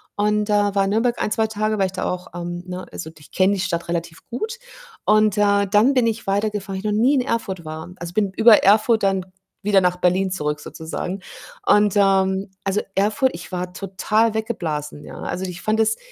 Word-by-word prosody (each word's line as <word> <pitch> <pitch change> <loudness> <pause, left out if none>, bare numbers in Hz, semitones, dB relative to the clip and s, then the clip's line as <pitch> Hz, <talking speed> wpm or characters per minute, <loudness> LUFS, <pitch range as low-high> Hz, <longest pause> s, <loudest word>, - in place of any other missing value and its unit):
und, 210 +1 +1
äh, - - +2
war 205 -1 +2
in 195 - -1
Nürnberg 235 +3 +1
1, - - -1
2 220 0 +1
Tage, 215 0 -1
weil 195 - +3
ich - - -8
da 185 - -4
auch, 180 0 -3
ähm, 175 0 -5
ne 180 0 -6
also, 160 - -7
ich 150 - -17
kenne 190 +2 +3
die - - -4
Stadt 170 -2 -2
relativ 170 -1 -3
gut 440 - -4 0.5
und, 215 -1 +4
äh, 200 -1 +3
dann 210 +7 +4
bin 250 -2 +3
ich 225 -1 -3
weitergefahren, 200 0 -1
weil - - -4
ich - - 0
noch 215 - +1
nie 265 +5 +4
in 265 - +3
Erfurt 195 - -3
war. 155 +2 -7
Also, 170 0 -7
bin 200 -1 +1
über 220 -1 +7
Erfurt 215 +3 +4
dann 195 -2 +1 0.4
wieder 200 -1 +4
nach 180 0 +1
Berlin 180 +2 +2
zurück 150 -5 -2
sozusagen 175 +4 -5 0.5
und, 210 -1 +4
ähm, 195 -1 +2
also, 195 +1 0
Erfurt 220 +7 +2
ich 175 +2 -9
war 180 0 -4
total 210 +4 0
weggeblasen, 160 -10 -3
ja. - - -10
Also, 185 - -4
ich 180 -1 -7
fand 215 +1 +1
das 220 0 +2
195 Hz, 210 wpm, -21 LUFS, 180-215 Hz, 0.5 s, über